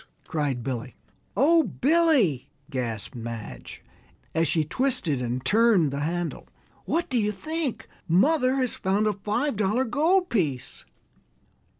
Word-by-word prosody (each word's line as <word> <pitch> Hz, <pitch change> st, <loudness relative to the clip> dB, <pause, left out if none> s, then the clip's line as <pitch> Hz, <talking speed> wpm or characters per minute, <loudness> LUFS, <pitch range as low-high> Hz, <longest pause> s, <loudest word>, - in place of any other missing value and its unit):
cried 140 Hz, -6 st, -1 dB
Billy. 125 Hz, -1 st, -4 dB, 0.4 s
"Oh, 325 Hz, +5 st, +5 dB
Billy," 270 Hz, -, +2 dB, 0.2 s
gasped 115 Hz, -5 st, -3 dB
Madge, 115 Hz, -, -8 dB, 0.5 s
as 165 Hz, 0 st, +2 dB
she 160 Hz, +1 st, +1 dB
twisted 170 Hz, -, 0 dB
and 125 Hz, +1 st, -3 dB
turned 205 Hz, -, +4 dB
the 140 Hz, -, -3 dB
handle, 170 Hz, +3 st, -3 dB, 0.4 s
"what 335 Hz, +1 st, 0 dB
do 250 Hz, -3 st, 0 dB
you 210 Hz, -1 st, +1 dB
think? 310 Hz, +5 st, -4 dB, 0.2 s
Mother 255 Hz, -, +3 dB
has 255 Hz, -3 st, 0 dB
found 200 Hz, +2 st, 0 dB
a 215 Hz, -, +2 dB
five 210 Hz, +6 st, -2 dB
dollar 215 Hz, +5 st, +1 dB
gold 325 Hz, +9 st, +2 dB
piece!" 150 Hz, -, -1 dB
200 Hz, 125 wpm, -26 LUFS, -, 0.5 s, Oh